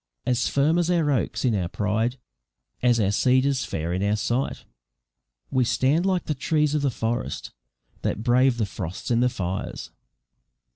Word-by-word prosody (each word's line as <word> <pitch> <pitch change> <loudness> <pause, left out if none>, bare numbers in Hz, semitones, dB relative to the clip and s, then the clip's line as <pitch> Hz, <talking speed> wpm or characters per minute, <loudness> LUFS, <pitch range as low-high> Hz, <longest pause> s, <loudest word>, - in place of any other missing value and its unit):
As 125 0 +1
firm 150 +5 +2
as 175 0 +1
our 165 -4 +2
oaks 130 0 -1
in 120 - +3
our 95 -4 0
pride, 110 +6 -1 0.6
as 120 -2 +3
our 100 -2 +2
cedars 130 +4 +2
fair 80 +2 -3
in 95 - -1
our 100 +1 +2
sight, 120 +5 -1 0.9
We 130 -1 +3
stand 145 +9 +2
like 185 -3 0
the 150 - -1
trees 150 +2 +1
of 150 - +1
the 140 - +2
forest 115 0 -3 0.5
that 110 - -2
brave 125 +1 +3
the 110 - +1
frosts 95 +2 -5
and 120 0 +3
the 125 - +4
fires." 95 -4 -4
125 Hz, 165 wpm, -25 LUFS, 105-140 Hz, 0.9 s, the